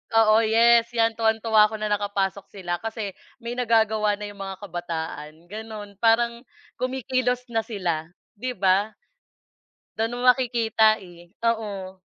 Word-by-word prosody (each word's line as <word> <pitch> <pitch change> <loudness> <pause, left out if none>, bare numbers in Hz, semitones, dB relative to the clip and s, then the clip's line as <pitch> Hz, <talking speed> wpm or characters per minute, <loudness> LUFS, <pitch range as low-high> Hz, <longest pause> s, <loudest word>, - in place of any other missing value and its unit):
oo, 220 -1 +6
yes, 230 +1 +5
yan 225 0 +1
tuwang-tuwa 220 -1 +4
ako 220 - -7
na 215 -1 -3
nakapasok 200 -1 -1
sila. 175 -3 -4
Kasi 220 -2 -4 0.3
may 240 +1 -4
nagagawa 220 -3 +2
na 210 0 -7
yung 200 - -16
mga 195 -1 -5
kabataan 165 -1 -6
ganun. 210 -2 -8
Parang 235 +1 +3 0.4
kumikilos 255 -1 -1
na 225 - +1
sila 180 -8 -3 0.3
di 250 +2 -3
ba? 195 +1 +3 1.1
Dun 225 +2 0
mo 245 - -5
makikita, 235 -4 +4
eh, 175 -1 -14 0.2
oo. 205 -5 -2
220 Hz, 135 wpm, -24 LUFS, 195-230 Hz, 1.1 s, oo